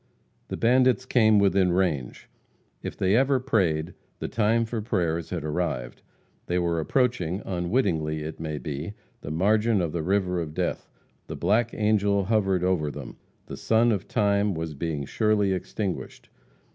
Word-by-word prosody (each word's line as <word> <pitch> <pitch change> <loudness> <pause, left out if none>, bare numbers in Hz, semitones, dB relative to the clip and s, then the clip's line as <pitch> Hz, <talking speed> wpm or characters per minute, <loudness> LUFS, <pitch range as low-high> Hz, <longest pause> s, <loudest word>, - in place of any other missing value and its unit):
The - - -5
bandits 130 +1 +3
came 110 -4 +4
within 95 -2 +3
range. 80 -10 -1 0.5
If - - -6
they 95 +2 +2
ever 135 +2 +3
prayed, 90 - 0 0.2
the - - -4
time 115 +1 +1
for 110 0 -3
prayers 85 -7 -1
had 85 -4 -4
arrived. 60 -5 -3 0.5
They 90 - 0
were 85 -2 0
approaching, 100 - 0
unwittingly 85 -5 -1
it 80 +1 -7
may 80 -2 -4
be, 75 +5 -5 0.3
the - - -7
margin 105 +7 +2
of 85 -3 -1
the 85 - -2
river 90 0 0
of 75 -2 -6
death; - - -2 0.4
the - - -5
black 110 +6 +1
angel 105 -2 +2
hovered 95 -3 +1
over 90 -5 +1
them, - - -8 0.3
the - - -8
sun 115 +1 +3
of 100 -5 -2
time 100 -1 +1
was 80 -1 -4
being 75 -1 -3
surely 105 - +1
extinguished. 95 +1 -5
95 Hz, 155 wpm, -26 LUFS, 80-110 Hz, 0.5 s, came